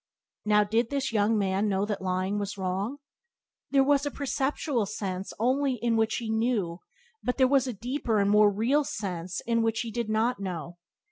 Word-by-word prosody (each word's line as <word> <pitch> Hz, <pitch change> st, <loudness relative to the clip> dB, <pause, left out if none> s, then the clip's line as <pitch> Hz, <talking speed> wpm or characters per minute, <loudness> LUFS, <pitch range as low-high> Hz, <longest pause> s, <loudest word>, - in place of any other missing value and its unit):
Now, 210 Hz, 0 st, +4 dB
did 225 Hz, +3 st, 0 dB
this 275 Hz, -4 st, -2 dB
young 215 Hz, +1 st, +3 dB
man 200 Hz, +1 st, +1 dB
know 195 Hz, 0 st, +1 dB
that 210 Hz, -2 st, -3 dB
lying 185 Hz, +2 st, -1 dB
was 205 Hz, 0 st, -4 dB
wrong? 195 Hz, +7 st, -2 dB, 0.7 s
There 275 Hz, -1 st, +4 dB
was 285 Hz, 0 st, +3 dB
a 290 Hz, -, -1 dB
perceptual 275 Hz, -4 st, -1 dB
sense 195 Hz, -2 st, -4 dB
only 260 Hz, +4 st, +1 dB
in 235 Hz, 0 st, 0 dB
which 225 Hz, 0 st, +1 dB
he 230 Hz, -, -3 dB
knew, 220 Hz, -7 st, 0 dB, 0.4 s
but 250 Hz, -, -2 dB
there 260 Hz, -1 st, +5 dB
was 270 Hz, -1 st, +3 dB
a 250 Hz, -, -2 dB
deeper 240 Hz, +1 st, -2 dB
and 200 Hz, 0 st, +3 dB
more 210 Hz, 0 st, +6 dB
real 240 Hz, +9 st, +2 dB
sense 185 Hz, -8 st, -4 dB
in 230 Hz, -1 st, +1 dB
which 225 Hz, 0 st, 0 dB
he 230 Hz, -2 st, -5 dB
did 235 Hz, -1 st, -3 dB
not 220 Hz, +1 st, +1 dB
know. 175 Hz, -2 st, -5 dB
220 Hz, 190 wpm, -28 LUFS, 200-250 Hz, 0.7 s, more